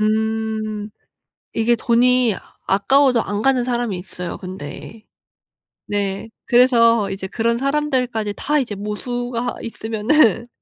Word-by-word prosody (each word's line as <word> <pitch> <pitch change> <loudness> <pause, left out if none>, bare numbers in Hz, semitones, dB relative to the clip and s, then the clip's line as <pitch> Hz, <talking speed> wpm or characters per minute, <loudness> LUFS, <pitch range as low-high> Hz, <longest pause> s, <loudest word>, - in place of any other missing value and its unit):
음 215 0 -1 0.6
이게 235 +1 +2
돈이 245 -1 +3 0.3
아까워도 250 +5 +3
안 205 +1 -3
가는 260 +1 +3
사람이 240 -6 -1
있어요 180 -1 -7
근데. 185 +4 -9 0.8
네 200 +1 -2 0.2
그래서 235 -3 +4
이제 190 0 -5
그런 230 +3 0
사람들까지 260 -6 0
다 300 +1 0
이제 245 -6 -3
모수가 245 +4 -3
있으면은 225 - +1
225 Hz, 245 characters per minute, -20 LUFS, 210-245 Hz, 0.8 s, 그래서